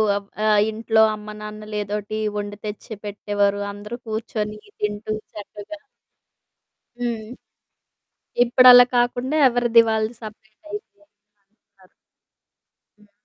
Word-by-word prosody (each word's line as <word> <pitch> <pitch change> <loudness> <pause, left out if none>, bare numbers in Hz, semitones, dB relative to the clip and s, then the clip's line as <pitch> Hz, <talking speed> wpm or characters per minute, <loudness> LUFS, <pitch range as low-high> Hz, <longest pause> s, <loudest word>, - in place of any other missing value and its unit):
ఆహ్, 210 +1 0
ఇంట్లో 220 0 +2
అమ్మ 210 0 -9
నాన్నలేదోటి 210 0 -5 0.2
వొండి 205 0 -5
తెచ్చిపెట్టేవారు. 205 -1 -2
అందరూ 210 +3 -8
కూర్చొని 215 -1 -3 0.2
తింటూ 210 +1 -2 0.2
చక్కగా 210 +8 -9 1.2
హ్మ్. 230 -3 -3 1.2
ఇప్పుడలా 245 0 +8
కాకుండా 245 +3 0
ఎవరిది 240 -1 +4
వాళ్ళది 220 +1 0
సపరేటయిపోయింది. 220 - -11 2.0
హ్మ్. 210 -1 -24
215 Hz, 75 wpm, -22 LUFS, 210-235 Hz, 2.0 s, ఇప్పుడలా